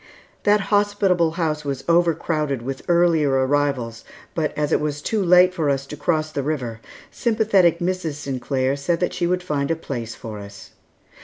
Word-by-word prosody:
That 205 0 +4
hospitable 195 -5 +2
house 155 -3 -1
was 140 -2 -4
over 170 -1 +4
crowded 150 -6 -2
with 135 +1 -5
earlier 170 -5 +3
arrivals, 130 -5 -1 0.3
but 155 -2 -1
as 150 -1 0
it - - +2
was 150 -1 -2
too 210 +7 -1
late 180 +1 +6
for 160 -5 0
us 135 -1 0
to 145 - -8
cross 155 +1 -1
the 140 - -2
river, 130 -6 -3 0.3
sympathetic 210 -7 +2
Mrs. 175 -2 -2
Sinclair 135 -1 -1
said 145 +5 -1
that 180 - -1
she 175 -1 -1
would 180 0 0
find 145 -5 -1
a 165 - +1
place 120 -8 -6
for 110 -2 -8
us. 100 0 -11
155 Hz, 175 wpm, -22 LUFS, 140-175 Hz, 0.3 s, late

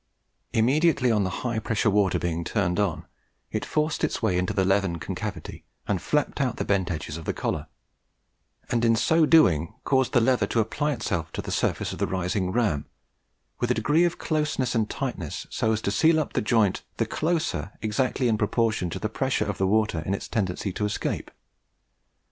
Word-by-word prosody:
Immediately 130 +2 +3
on 105 -2 +2
the 95 - -1 0.2
high 120 -2 0
pressure 110 -1 +1
water 100 -2 +2
being 85 -1 -2
turned 90 -1 0
on, 100 -6 0 0.5
it - - -2
forced 155 0 -1
its - - 0
way 110 -6 +1
into 90 +1 0
the 95 -2 +1
leathern 95 -3 +1
concavity 90 +1 -6 0.2
and 95 -4 0
'flapped 150 -1 0
out' 130 -4 0
the - - -2
bent 95 -3 +1
edges 80 -1 -4
of 80 - -9
the - - -2
collar; - - -2 1.0
and, 115 -1 +1
in 115 -1 +4
so 160 +8 +3
doing, 85 - +4
caused 130 -2 +1
the 120 - +6
leather 125 +2 +2
to 115 - 0
apply 145 +7 0
itself 85 - -3
to - - -3
the - - -5
surface - - 0
of - - -8
the - - +1
rising 95 0 -1
ram 95 -10 0 0.7
with 120 - 0
a 125 - +2
degree 145 +10 +3
of 175 -1 +1
closeness 150 -5 -1
and 110 -3 +1
tightness 120 - -4
so 110 - +1
as 110 -1 0
to 100 - 0
seal 160 +10 +4
up 155 - -3
the - - +1
joint 105 -3 +2 0.2
the - - +1
closer 160 - -1
exactly 125 +4 0
in 110 -2 +1
proportion 110 -3 +1
to - - -4
the - - -2
pressure - - -1
of - - -4
the 95 - +2
water 105 -4 +2
in 95 +5 -1
its - - -6
tendency 95 -3 -2
to 105 - -3
escape. 105 - -2
110 Hz, 195 wpm, -26 LUFS, 95-125 Hz, 1.0 s, the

